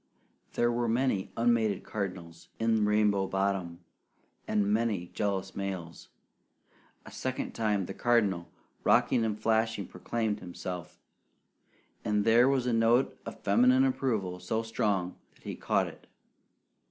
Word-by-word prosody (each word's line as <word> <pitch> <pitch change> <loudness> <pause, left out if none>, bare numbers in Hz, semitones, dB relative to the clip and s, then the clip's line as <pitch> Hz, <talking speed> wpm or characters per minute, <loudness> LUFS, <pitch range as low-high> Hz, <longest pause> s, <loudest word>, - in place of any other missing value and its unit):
There 120 0 +2
were 120 0 0
many 115 -4 0
unmated 115 -4 +2
cardinals 90 -5 -6
in 115 -2 +2
Rainbow 105 -2 +2
Bottom, 95 -3 -1 0.7
and 105 -1 +1
many 105 -6 0
jealous 100 -2 -2
males. 95 -4 -5 1.0
A - - -11
second - - -3
time 105 -4 0
the - - -6
Cardinal, 100 -8 +1 0.3
rocking 115 - +3
and 110 -1 -1
flashing, 110 -2 +1
proclaimed 110 +4 -2
himself; 90 -1 -7 1.1
and 105 -1 +1
there 120 +3 +6
was 135 -2 +1
a 125 - +1
note 115 +3 +3
of - - -8
feminine 255 +2 +5
approval 110 - -1
so 110 +6 -2
strong 105 -5 -1 0.2
that - - -25
he - - -5
caught - - +1
it. - - -11
105 Hz, 130 wpm, -30 LUFS, 95-115 Hz, 1.1 s, there